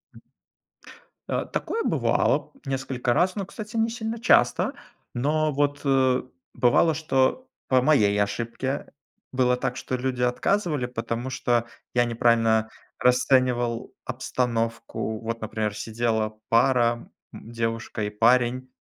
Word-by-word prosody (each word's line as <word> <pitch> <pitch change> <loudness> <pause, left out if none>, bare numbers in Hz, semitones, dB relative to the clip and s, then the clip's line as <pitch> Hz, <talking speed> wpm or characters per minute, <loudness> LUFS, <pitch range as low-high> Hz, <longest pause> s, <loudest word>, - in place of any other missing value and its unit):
М. - - -14 1.1
Э, - - -1
такое 455 +1 -2
бывало - - +1
несколько 130 -2 -1
раз, 180 +7 +2
но, 200 -3 -3
кстати, 215 +3 -7
не 225 +1 +2
сильно 225 0 -4
часто. 230 - +3 0.4
Но 150 +5 +1
вот, 145 +1 0
э, 130 -2 +3 0.3
бывало, 130 +6 +3
что 155 - 0 0.2
по 130 -1 +4
моей 105 -8 +3
ошибке 115 +6 -3 0.4
было 125 -1 +2
так, 125 0 -3
что 130 - -3
люди 125 0 -2
отказывали, 145 +4 +1
потому 120 0 -4
что 120 -2 0 0.3
я 120 0 +3
неправильно 115 -1 +2 0.3
расценивал 125 -1 +2
обстановку. 115 -3 -2
Вот, 115 +1 -4
например, 110 -1 -2
сидела 110 0 -2
пара, 120 0 +2 0.2
м, 115 - -11
девушка 115 -1 -3
и 105 - -1
парень. 125 +4 +2
125 Hz, 120 wpm, -25 LUFS, 115-135 Hz, 1.1 s, по